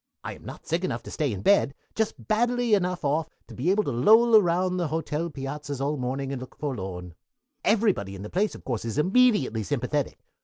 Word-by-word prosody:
I - - -5
am - - -15
not - - -10
sick 165 +3 -1
enough 185 - -2
to - - -9
stay 150 -5 -1
in 100 -2 -5
bed, 170 -8 +4
but - - -40
just 220 -1 -2
badly 240 +1 +1
enough 180 -4 +1
off 155 +3 0 0.2
to - - -13
be 140 +8 -1
able 205 +3 +3
to 140 - -2
loll 220 - +5
around 185 -2 +3
the 175 -2 0
hotel 160 +1 -2
piazzas 145 0 -5
all 140 +2 0
morning 135 +1 -3
and 135 -2 -4
look 130 - -10
forlorn. 95 - -5 0.5
"Everybody 200 - +1
in 95 - -8
the 105 - -7
place, 205 +4 0
of - - -12
course, 120 -4 -3
is 115 +2 -4
immediately 185 - +3
sympathetic. 100 - -2
150 Hz, 215 wpm, -26 LUFS, 130-200 Hz, 0.5 s, loll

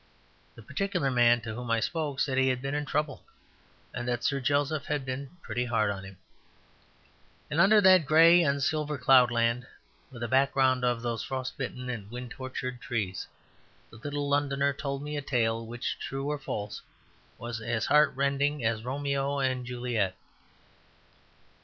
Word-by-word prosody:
The 115 - -13
particular 170 - -1
man 120 -1 +4
to 110 -1 -6
whom 120 +1 -6
I 115 0 +2
spoke 150 +1 -2
said 135 -3 +1
he 130 0 +3
had 130 -1 +1
"been 135 +2 -4
in 145 0 -2
trouble," 150 0 -2 0.7
and 120 0 -4
that 120 -1 -1
Sir 140 -1 +1
Joseph 145 +3 0
had 145 -3 -2
been 135 +5 -6
"pretty 120 +2 -2
hard 110 -4 +1
on 95 -1 -6
him." 95 -1 -11 1.3
And 160 - +3
under 210 +3 +6
that 185 -6 +6
grey 165 +3 +7
and 140 -3 +1
silver 150 0 -1
cloudland, 125 -2 +4 0.4
with 120 -3 -8
a - - -1
background 130 0 +2
of 120 -1 0
those 115 -2 -2
frost 130 -1 -4
bitten 125 -1 -5
and 110 -5 -5
wind 125 +1 -7
tortured 125 -1 -5
trees, 105 -7 -3 0.6
the - - -13
little 145 +4 -3
Londoner 140 0 +1
told 140 -1 -4
me 150 0 -4
a - - -2
tale 115 -4 0
which, 120 +1 -4
true 135 +2 -3
or 150 - -3
false, 105 -5 -5 0.6
was 120 -1 -6
as 115 -1 -1
heartrending 140 -2 +2
as 110 -1 0
Romeo 140 +2 -1
and 130 -2 -1
Juliet. 120 -6 -1
130 Hz, 165 wpm, -28 LUFS, 120-145 Hz, 1.3 s, grey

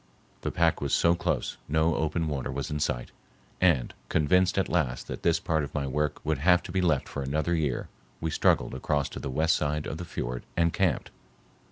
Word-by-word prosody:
The - - -1
pack 85 -1 +2
was 70 -1 +1
so 85 - +4
close 85 - -1
no 80 +2 +2
open 80 +1 0
water 70 -4 -2
was 70 +1 -4
in 75 - -1
sight, 65 -5 -2 0.5
and, 85 -10 +3 0.2
convinced 90 +5 +3
at 95 - +2
last 70 -9 0
that - - -6
this 85 -1 +3
part 80 -3 0
of 70 - -7
my 70 -2 0
work 75 +2 -1
would - - 0
have 90 +3 +4
to - - -7
be 95 - +1
left 80 -6 +2
for - - -5
another 75 +5 0
year, 75 -7 -1 0.3
we 80 - -2
struggled - - +2
across 70 +2 0
to - - -7
the 70 - -4
west 80 +5 +2
side 75 0 -1
of 80 - -5
the - - -4
fiord - - -4
and 85 0 +3
camped. - - 0
75 Hz, 210 wpm, -28 LUFS, 70-85 Hz, 0.5 s, so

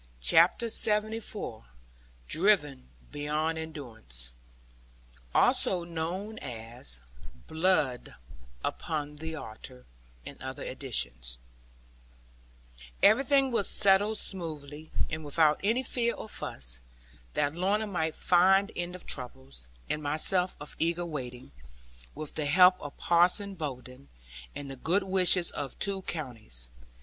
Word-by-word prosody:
CHAPTER 165 - +5
LXXIV 215 - -1 0.6
DRIVEN 150 - +2 0.2
BEYOND 155 +2 -1
ENDURANCE 110 - -8 1.0
[Also 180 -2 +4
known 175 +6 -4
as 115 - -7 0.4
BLOOD 160 -7 0 0.5
UPON 150 -1 -3
THE 160 +1 -5
ALTAR 110 - -9 0.4
in - - -10
other - - -6
editions] - - -1 1.7
Everything 270 +5 +5
was 230 -4 +2
settled 205 +2 +4
smoothly, 155 -5 -4 0.2
and 155 0 -3
without 150 +1 +3
any 230 +6 +2
fear 235 -2 +1
or - - -8
fuss, - - -5 0.5
that 145 0 +1
Lorna 195 +5 +1
might 160 -6 -1
find 190 +3 +4
end 175 +1 -4
of 180 - -9
troubles, 65 - -7 0.2
and 150 - -2
myself 155 +5 +1
of 145 - -6
eager 170 +1 0
waiting, 125 - -6 0.6
with 155 -1 -5
the 150 -2 -1
help 180 +4 +6
of 145 - -8
Parson 180 +4 +3
Bowden, 135 -5 -7 0.5
and 140 -1 -6
the - - -6
good 180 +9 +1
wishes 185 -2 +4
of 140 -3 -5
two 195 -1 -1
counties. 115 - -6
160 Hz, 110 wpm, -29 LUFS, 135-190 Hz, 1.7 s, help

